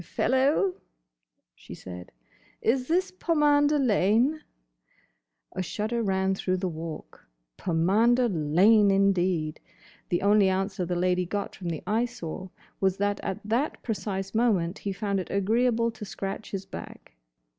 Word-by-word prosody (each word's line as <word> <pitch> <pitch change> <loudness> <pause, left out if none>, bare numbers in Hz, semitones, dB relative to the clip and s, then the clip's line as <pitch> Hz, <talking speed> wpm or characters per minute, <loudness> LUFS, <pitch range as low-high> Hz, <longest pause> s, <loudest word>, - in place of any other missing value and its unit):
"Fellow," 275 - +1 0.8
she - - -11
said, 90 -1 -10 0.5
"is 250 +2 +1
this 365 +3 +1
Pomander 295 -4 +3
Lane?" 245 +4 +2 1.1
A 185 - -3
shudder 215 +6 -2
ran 190 -2 +1
through 185 -1 -1
the 185 0 -2
Walk. 160 -2 -8 0.3
Pomander 215 - +2
Lane, 195 +5 +4
indeed!—The 180 -3 -1
only 200 -1 +5
answer 190 -1 -1
the 180 - -1
lady 180 0 +1
got 200 +2 -3
from 180 -3 -5
the 160 -3 -4
Eyesore 215 -5 -3 0.3
was 190 -1 +1
that 205 0 0
at 190 - -4
that 235 +8 -1
precise 195 -4 -3
moment 205 -6 +1
he 200 - -3
found 200 0 -2
it 185 - -6
agreeable 230 +4 +1
to 220 - -10
scratch 195 +1 -5
his 195 -1 -5
back. 190 - -10
200 Hz, 130 wpm, -27 LUFS, 185-235 Hz, 1.1 s, only